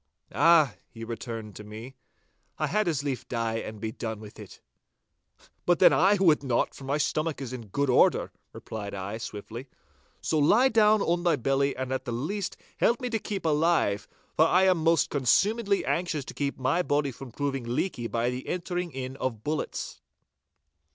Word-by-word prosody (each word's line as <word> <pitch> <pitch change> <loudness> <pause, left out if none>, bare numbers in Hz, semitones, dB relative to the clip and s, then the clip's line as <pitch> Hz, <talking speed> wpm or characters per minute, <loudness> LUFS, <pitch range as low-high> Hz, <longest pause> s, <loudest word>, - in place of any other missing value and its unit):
'Ah,' 165 -5 +5 0.2
he 115 - -10
returned 115 -2 -6
to 105 - -9
me, 110 +5 -9 0.6
'I - - 0
had 215 -1 0
as 150 -5 0
lief 135 -3 -3
die 115 -2 -1
and 110 -1 -6
be 110 +1 -3
done 110 -1 -5
with 105 -1 -12
it.' - - -11 1.1
'But 175 -1 +4
then - - +7
I 195 +5 +5
would 175 -7 +4
not, 130 -4 0
for 135 - -11
my 140 +2 0
stomach 155 +1 -1
is 130 -3 -6
in 120 -4 -7
good 140 +8 -1
order,' 125 - +3 0.2
replied 100 -2 -7
I, 100 +3 -5
swiftly, 115 +4 -7 0.5
'so 155 - 0
lie 225 - +5
down 215 -3 +4
on 175 +1 +1
thy 175 -2 +3
belly 135 +1 +1
and 130 0 -3
at 130 - -2
the 120 - -3
least 185 - -3 0.2
help 235 - +2
me 250 -2 -4
to 225 - 0
keep 200 -3 -5
alive, 150 -10 +2 0.3
for 160 - +5
I 185 +3 +4
am 185 -2 +4
most 165 0 +2
consumedly 200 - +2
anxious 170 -5 -1
to - - -8
keep 140 -1 -2
my 135 +7 +1
body 145 -4 0
from 130 +1 -10
proving 135 0 -2
leaky 120 +1 -2
by 120 +1 0
the 125 +1 -6
entering 175 0 -3
in 130 0 -5
of 115 -6 -3
bullets. 155 +1 -4
140 Hz, 185 wpm, -27 LUFS, 120-170 Hz, 1.1 s, then